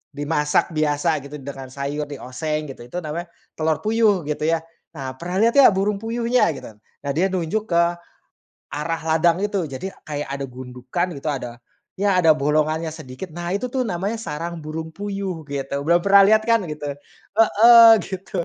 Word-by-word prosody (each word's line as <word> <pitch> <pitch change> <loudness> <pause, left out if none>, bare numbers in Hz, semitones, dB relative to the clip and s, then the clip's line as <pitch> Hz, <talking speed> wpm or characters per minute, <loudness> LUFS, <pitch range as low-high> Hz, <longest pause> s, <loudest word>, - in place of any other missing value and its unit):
dimasak 150 +3 0
biasa 150 0 +1
gitu 145 +1 -8
dengan 135 -1 -8
sayur, 140 +2 -3
dioseng 150 +3 -4
gitu. 120 - -11
Itu 180 - -4
namanya 170 +3 -5 0.3
telur 160 0 0
puyuh, 215 -5 +2
gitu 150 0 -3
ya. 165 0 +2 0.4
Nah, 130 -2 -6
pernah 180 +2 -4
lihat 230 +1 +4
gak 270 -6 +8
burung 200 +2 +1
puyuhnya?" 235 +2 +1
Gitu. - - -9
Nah, 125 +6 -8
dia 185 +4 +2
nunjuk 190 +4 -2
ke 170 0 +4 0.9
arah 165 +3 -2
ladang 165 +2 +2
itu. 200 -4 -1
Jadi 135 +8 -5 0.2
kayak 145 -1 -4
ada 140 0 -3
gundukan 125 +7 -4
gitu, 140 - -11
ada, 120 -4 -5 0.4
ya 200 -2 +2
ada 160 -2 +6
bolongannya 155 +2 0
sedikit. 155 +3 -9
"Nah, 175 0 -5
itu 250 - -3
tuh 265 - 0
namanya 200 +3 -2
sarang 170 -2 -5
burung 160 +1 -5
puyuh, 195 -4 -4
gitu. 140 0 -3
Belum 170 +1 +4
pernah 200 0 +7
lihat 215 - +3
kan?" 230 -1 +4
Gitu. 150 -1 -6 0.5
Heeh, 230 +1 +8
gitu. 190 -2 -4
165 Hz, 170 wpm, -22 LUFS, 145-195 Hz, 0.9 s, gak